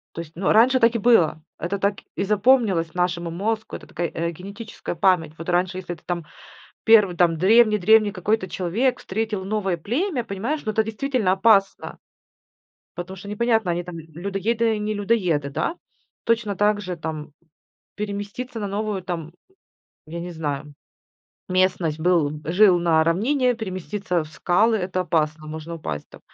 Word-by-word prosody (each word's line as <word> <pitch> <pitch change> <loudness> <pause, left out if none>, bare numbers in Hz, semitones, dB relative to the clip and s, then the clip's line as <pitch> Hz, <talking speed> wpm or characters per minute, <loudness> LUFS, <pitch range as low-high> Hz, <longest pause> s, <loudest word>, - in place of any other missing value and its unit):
То - - -4
есть, 160 -1 -14
ну, 185 +3 0
раньше 250 +4 +5
так 230 0 +4
и - - 0
было, 205 -9 +4 0.2
это 195 +4 -3
так 200 +1 0 0.2
и 195 - 0
запомнилось 205 -6 +2
нашему 175 -1 -1
мозгу, 215 +6 -3
это - - -12
такая, 175 -1 -3
э, 170 +1 -2
генетическая 200 +5 -7
память. 165 -4 +2
Вот 165 - -8
раньше, 180 +1 +1
если 175 -1 -5
это - - -21
там 175 -2 -3 0.6
первый 210 -6 +5
там 165 -2 +3
древний-древний 215 +1 +5
какой-то 195 +1 -1
человек 220 +10 0
встретил 210 -1 -3
новое 195 -3 -1
племя, 250 - -1
понимаешь, 230 +11 -3
ну 215 - 0
это 220 - +2
действительно 220 -2 0
опасно. 195 0 +2 1.0
Потому 185 +2 -6
что 200 +2 -10
непонятно, 225 -2 +1
они 175 +1 -1
там 175 -1 -8
л 160 - -9
людоеды, 210 +5 0
не 210 0 -2
людоеды, 185 -9 0
да? 325 - -2 0.5
Точно 230 -3 0
также 205 -3 0
там 155 -2 -6 0.6
переместиться 205 +4 -5
на 205 - -3
новую 205 -1 -2
там, 170 -3 -5 0.7
я 170 +2 -6
не 175 +1 -6
знаю, 150 -2 -4 0.7
местность. 185 -4 +1
Был 155 -4 +1
жил 180 +2 +5
на 165 -2 +3
равнине, 245 - +2
переместиться 185 -4 -3
в - - -12
скалы- 205 +8 +2
это 185 -2 -2
опасно, 155 -3 -1
можно 160 +2 -6
упасть 75 - -5
там. - - -14
190 Hz, 155 wpm, -23 LUFS, 170-215 Hz, 1.0 s, раньше